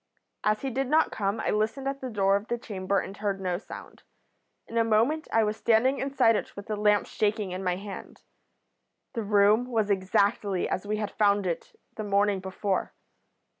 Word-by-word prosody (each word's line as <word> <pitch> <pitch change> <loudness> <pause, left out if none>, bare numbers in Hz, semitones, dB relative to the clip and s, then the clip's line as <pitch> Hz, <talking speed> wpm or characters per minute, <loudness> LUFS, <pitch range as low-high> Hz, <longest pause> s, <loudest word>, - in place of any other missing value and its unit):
As 215 0 +1
he 270 - -2
did 265 +2 -1
not 310 +4 +3
come 200 +1 -1
I - - 0
listened 220 +6 -1
at 275 0 -3
the 260 - -4
door 195 -3 +2
of 200 +2 -2
the 240 - -1
chamber 200 -4 -2
and 195 - -6
heard 200 -1 -2
no 180 -2 -2
sound. - - -11 0.7
In 230 - -1
a - - +4
moment 230 +8 +2
I 225 - +4
was 210 0 -1
standing 245 +4 +3
inside 265 -5 +3
it - - -4
with 200 - -8
the 215 - -3
lamp 210 0 +3
shaking 210 -2 -1
in 185 +1 -4
my 180 -1 +1
hand. 195 +1 -9 0.9
The 230 - -2
room 210 +2 +4
was 220 -4 0
exactly 195 0 +1
as 190 - -3
we 215 +1 -1
had 210 -2 -3
found 205 -1 +2
it 170 -2 -4 0.2
the 215 - -3
morning 200 -1 +2
before. 190 +1 -2
210 Hz, 195 wpm, -27 LUFS, 200-225 Hz, 0.9 s, a